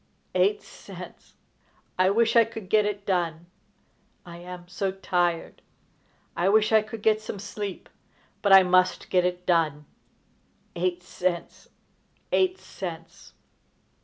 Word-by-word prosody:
Eight 415 +1 +2
cents! - - -12 0.6
I 185 0 +5
wish 225 +3 +2
I 230 - +8
could 225 -4 -9
get 210 -1 +4
it 205 -1 -4
done! 170 -3 -1 0.8
I 170 -1 -10
am 175 0 -10
so 190 +2 -2
tired! 175 -3 -1 0.7
I 175 +3 +1
wish 215 +1 +3
I 220 -1 +6
could 215 0 -9
get 215 -1 +3
some 215 - -6
sleep, 205 -1 -6 0.5
but 200 - +2
I 195 0 +9
must 185 0 +2
get 180 -1 +3
it 180 0 -2
done! 155 -4 +1 0.9
Eight 180 0 -1
cents! 180 -2 -4 0.6
Eight 370 0 +2
cents!" 170 0 -9
185 Hz, 130 wpm, -26 LUFS, 175-210 Hz, 0.9 s, I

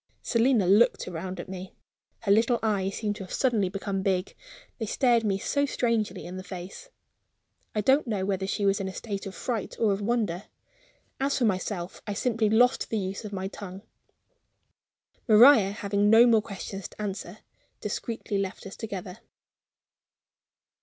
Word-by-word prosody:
Selina 230 -3 +3
looked 205 +6 +4
round 185 +1 -5
at - - -6
me. 185 0 -8 0.5
Her 200 - +1
little 230 +4 +4
eyes 195 -3 0
seemed 210 -2 -2
to 200 - -6
have 185 - -11
suddenly 225 -8 +1
become 195 0 -3
big, 190 -1 -1 0.4
they 220 - -3
stared 240 0 +3
me 200 -3 +1
so 285 +8 0
strangely 225 -7 -1
in 180 +1 -7
the 185 - -6
face. 185 - -9 0.9
I 210 - +2
don't 265 +6 +3
know 205 -4 -1
whether 190 -1 -1
she 200 +1 -1
was 195 +1 +3
in 195 - -3
a 190 - -6
state 200 -3 -5
of 195 - -8
fright 230 -5 -3
or 215 -3 +2
of 195 - -3
wonder. 205 -5 -1 0.7
As 275 +1 +1
for 245 - +2
myself, 185 -2 -2
I 205 - -2
simply 225 -1 +1
lost 245 +3 +3
the 225 - -1
use 195 +2 -4
of 210 - -6
my 190 -1 -3
tongue. 195 0 -9 1.4
Maria, 225 -2 +8
having 200 0 0
no 225 +2 +8
more 230 -3 +5
questions 200 -2 -7
to - - -20
answer, 195 -2 -5 0.4
discreetly 210 -1 -3
left 195 -1 -4
us 195 - -8
together. 200 -2 -6
205 Hz, 165 wpm, -27 LUFS, 190-225 Hz, 1.4 s, Maria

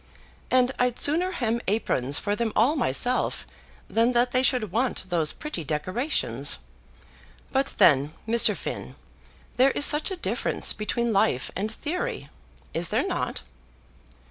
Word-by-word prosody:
And 255 0 +3
I'd 250 -1 +1
sooner 335 +6 +2
hem 235 -8 -1
aprons 145 - 0
for 205 0 -2
them 230 0 -1
all 250 +8 +3
myself 245 - 0 0.4
than 230 +2 +1
that 245 +1 +2
they 255 - +2
should 250 -6 +1
want 225 -4 -1
those 165 -3 +1
pretty 300 - -6
decorations. 185 - -1 0.9
But 270 +1 -1
then, 145 0 +4 0.2
Mr. 230 +1 +5
Finn, - - -6 0.6
there 260 +2 +5
is 285 - +2
such 300 +4 +4
a 380 - -4
difference - - 0
between 235 +2 -2
life 135 -9 +1
and 210 +3 -3
theory; 360 - -4 0.4
is 165 0 -1
there - - 0
not?" - - -3
235 Hz, 140 wpm, -25 LUFS, 190-265 Hz, 0.9 s, Mr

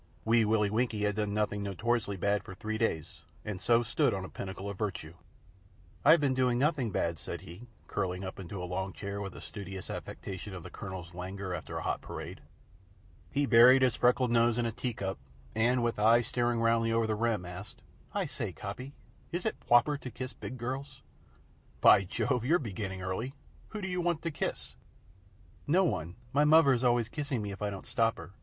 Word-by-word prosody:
Wee 115 0 +4
Willie 105 -1 +2
Winkie 110 -2 0
had 105 -1 +1
done 105 -1 -1
nothing 105 -1 0
notoriously 100 +1 -1
bad 100 +3 +1
for 95 - -9
three 110 +3 -3
days, 80 -9 -1 0.2
and 105 -3 -4
so 120 0 +4
stood 120 +1 +1
on 95 -1 -4
a - - -8
pinnacle 95 +1 -6
of 100 - -4
virtue. 90 -7 -3 0.9
"I've 165 - +7
been 140 -3 +2
doing 125 -2 +2
nothing 140 -3 +1
bad," 85 -4 -1
said - - -6
he, 90 +9 -11 0.2
curling 95 -2 -2
himself 95 +1 -6
into 95 0 -6
a - - -2
long 95 +2 -3
chair 100 0 -5
with 95 -2 -6
a - - -9
studious 95 -2 -7
affectation 95 +1 -6
of 90 - -7
the - - -9
Colonel's 95 -4 -7
languor 95 +1 -5
after 90 - -5
a - - -4
hot - - -1
parade. - - -7 0.9
He 145 +1 +2
buried 125 +2 +8
his 125 -3 +4
freckled 125 0 +3
nose 120 0 +4
in 120 - +1
a 115 - 0
tea 120 0 -3
cup 95 -7 -3 0.3
and, 120 +3 +2
with 115 -2 0
eyes 115 +2 +5
staring 120 -1 0
roundly 115 0 +3
over 115 0 +2
the 110 - 0
rim, 110 -4 0
asked: 90 +3 -9 0.3
"I - - -1
say, - - -4
Coppy, 125 +8 -7 0.4
is 175 +1 -3
it 220 - -1
pwoper 140 +4 +4
to 125 - -5
kiss 130 +1 -6
big 110 +5 -7
girls?" 130 +3 -5 0.8
"By 100 - +7
Jove! 125 +6 0
You're 160 +8 +4
beginning 100 - -5
early. 115 +9 -3 0.3
Who 215 - -6
do 190 - -3
you 180 -1 -1
want 170 -2 0
to 165 - -1
kiss?" 145 - -4 0.9
"No 180 +6 +4
one. 90 - -1 0.2
My 145 +2 +4
muvver's 150 -5 +6
always 120 -2 +3
kissing 140 -3 -3
me 100 - -4
if 100 - -9
I 105 - 0
don't 100 -2 -7
stop 115 0 +1
her. - - -9
115 Hz, 200 wpm, -31 LUFS, 100-125 Hz, 0.9 s, buried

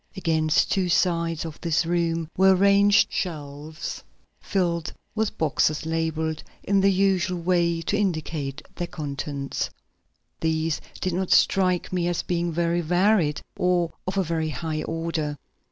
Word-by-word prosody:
Against 160 -4 +2
two 185 -2 +1
sides 170 -2 +1
of 160 -2 -8
this 165 -1 +1
room 165 -1 0
were 190 0 +5
arranged 200 +2 +5
shelves 155 -2 -5 0.4
filled 170 -4 -1 0.2
with 220 -1 -1
boxes 155 0 +1
labeled 160 -1 -1 0.2
in 200 -1 +2
the 195 +1 +5
usual 190 -1 +1
way 170 -1 +1
to 200 - 0
indicate 155 -7 -2
their 175 - -2
contents. 140 -2 -4 0.7
These 160 -1 0 0.2
did 185 - -1
not 185 +1 -1
strike 185 -2 +3
me 175 -1 +1
as 175 -1 -1
being 175 -1 -1
very 170 +1 +1
varied 175 -2 +2
or 180 -2 +1
of 190 +1 -2
a 190 - +3
very 160 -2 -1
high 155 0 -3
order. 165 -3 -3
170 Hz, 135 wpm, -25 LUFS, 160-185 Hz, 0.7 s, were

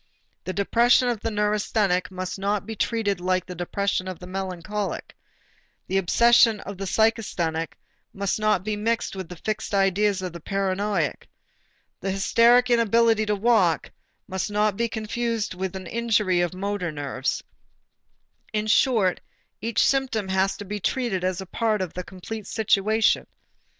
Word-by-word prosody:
The - - -2
depression 240 +5 +3
of 235 -3 -1
the 225 - -2
neurasthenic 210 -3 +1
must 185 0 -5
not 200 +1 -1
be 225 - -6
treated 205 -3 0
like 185 0 0
the 180 - -7
depression 185 +2 -2
of 185 -2 -5
the 180 - -10
melancholic, 190 +2 -4 0.7
the 195 - +1
obsession 230 +4 +5
of 200 -1 -8
the 195 - -3
psychasthenic 180 -7 0 0.4
must 200 0 -2
not 215 -4 +2
be 215 +1 -2
mixed 225 0 -1
with 190 -3 -6
the 180 - -7
fixed 215 +3 -3
ideas 195 0 +2
of 180 -2 -5
a - - -6
paranoiac, 195 -2 -1 0.7
the 195 - -3
hysteric 235 +5 +4
inability 230 -1 +3
to 210 - +2
walk 200 -6 +2 0.4
must 190 0 -3
not 210 0 +1
be 235 +2 0
confused 225 0 -2
with 190 +1 -4
an 190 -1 -6
injury 210 -3 +1
of 175 - +1
the 180 - -12
motor 195 -3 -2
nerves; 140 -3 -3 1.1
in 215 0 -1
short, 215 -4 +3 0.4
each 230 +1 +2
symptom 255 -7 0
has 190 +1 +1
to 205 - -7
be 205 +2 -4
treated 200 -1 -1
as 185 +1 -1
part 220 -2 +1
of 185 -3 -4
a 180 - -3
complete 190 +4 -8
situation. 220 0 +2
200 Hz, 155 wpm, -25 LUFS, 185-220 Hz, 1.1 s, obsession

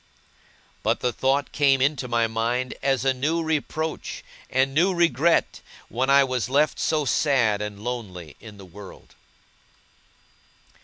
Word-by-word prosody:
But - - 0
the 125 -1 0
thought 135 +2 0
came 140 -2 +3
into 135 -1 0
my 120 -1 +1
mind 115 +3 -2
as 135 -2 0
a 135 - +3
new 155 +6 -1
reproach 155 0 -3 0.3
and 135 +1 +1
new 180 +5 +2
regret, 170 -1 +2 0.3
when 130 +3 -1
I 140 0 +6
was 130 -3 -2
left 145 +3 +1
so 155 -2 0
sad 125 -7 +1
and 105 0 -6
lonely 95 -10 -6
in 105 -3 -12
the 100 - -12
world. 95 +2 -13
130 Hz, 140 wpm, -24 LUFS, 115-145 Hz, 0.3 s, I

